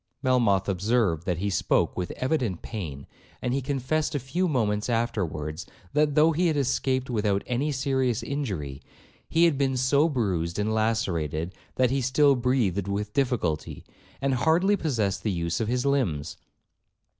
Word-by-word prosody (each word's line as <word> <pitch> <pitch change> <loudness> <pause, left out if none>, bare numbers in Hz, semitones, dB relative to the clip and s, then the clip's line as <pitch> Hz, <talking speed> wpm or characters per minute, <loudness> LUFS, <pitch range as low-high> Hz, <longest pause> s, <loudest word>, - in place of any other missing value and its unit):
Melmoth 115 -7 +3
observed 100 -3 +1
that 90 -3 0
he 100 +3 -1
spoke - - +1
with 90 0 -3
evident 130 - -1
pain, 75 - -6 0.3
and 125 - -2
he 135 - 0
confessed 140 +4 -1
a - - +1
few 145 +9 -1
moments 105 -7 0
afterwards, 90 -9 -2 0.3
that 150 -1 +2
though 155 +2 +5
he 175 +3 +1
had 155 -3 +1
escaped 130 -1 0
without 105 -3 0
any 130 +5 -1
serious 130 -3 0
injury, 90 - -4 0.5
he 165 +1 +4
had 155 -5 +2
been 135 -2 +1
so 140 +5 +3
bruised 90 - -1
and 105 +1 0
lacerated, 90 -7 -1 0.2
that 130 -1 +2
he 135 0 +1
still 135 +3 +4
breathed 120 -7 0
with 105 +1 -3
difficulty, 120 - -1 0.4
and 135 -1 +2
hardly 165 +10 +3
possessed 115 - -1
the 110 - -1
use 85 -2 -1
of 115 - -1
his 125 +3 0
limbs. 90 - 0
120 Hz, 155 wpm, -26 LUFS, 95-140 Hz, 0.5 s, though